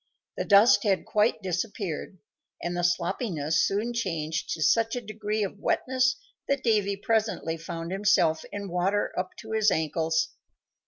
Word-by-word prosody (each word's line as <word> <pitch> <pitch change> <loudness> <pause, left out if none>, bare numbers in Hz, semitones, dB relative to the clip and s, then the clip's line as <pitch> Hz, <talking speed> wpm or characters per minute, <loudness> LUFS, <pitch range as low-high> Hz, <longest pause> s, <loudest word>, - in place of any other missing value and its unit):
The - - -3
dust 205 +4 +6
had 195 -4 +1
quite 210 0 +1
disappeared, 190 -1 -3 0.5
and 175 0 -2
the 175 - -1
sloppiness 175 - 0
soon 215 +5 0
changed 165 -8 -2
to 160 - -8
such 225 +5 +3
a - - -1
degree 215 0 -2
of 200 +1 -5
wetness 255 +2 +1 0.3
that 280 -1 0
Davy 210 -4 +2
presently 215 -6 0
found 165 +1 -6
himself 175 -5 +2
in 200 -1 -5
water 190 +3 0
up 185 0 -3
to 220 - -10
his 220 -1 +3
ankles. 160 -2 0
200 Hz, 150 wpm, -27 LUFS, 170-220 Hz, 0.5 s, dust